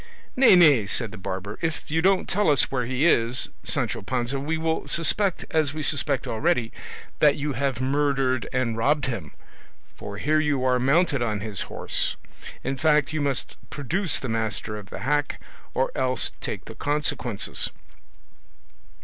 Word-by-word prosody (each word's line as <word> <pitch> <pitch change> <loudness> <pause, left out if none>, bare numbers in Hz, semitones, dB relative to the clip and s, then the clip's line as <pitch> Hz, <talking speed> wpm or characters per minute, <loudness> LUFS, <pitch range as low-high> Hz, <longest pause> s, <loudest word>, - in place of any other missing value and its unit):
"Nay, 255 -6 +7
nay," 145 - +6
said 115 +1 -1
the 105 - -9
barber, 95 +2 -5
"if 160 -2 -3
you 160 +1 +2
don't 190 +1 +2
tell 205 -2 +2
us 145 -3 +3
where 125 -3 -1
he 130 +4 0
is, 120 -6 +2
Sancho - - -1
Panza, 125 +4 -2
we 155 +4 -2
will 160 0 -2
suspect 180 +3 +2
as 155 -3 +1
we 155 - -3
suspect 140 -3 +2
already, 125 -1 0 0.5
that 150 -2 +5
you 145 0 -2
have 135 -1 -1
murdered 135 -2 0
and 125 -3 0
robbed 140 +5 +1
him, 100 - -5 0.6
for 100 0 -8
here 155 +7 +2
you 145 -4 0
are 125 -1 +3
mounted 140 +2 +2
on 105 -4 -1
his 105 -3 -4
horse; - - -1 0.5
in 135 +1 -2
fact, 150 +1 +2
you 155 - -1
must 140 -2 -2
produce 165 +5 -1
the 130 - -5
master 110 -1 -2
of 105 -2 -9
the - - -7
hack, 145 +3 0 0.4
or - - +1
else - - -1
take - - -5
the - - -9
consequences." 145 -7 -1
135 Hz, 165 wpm, -25 LUFS, 120-155 Hz, 0.6 s, Nay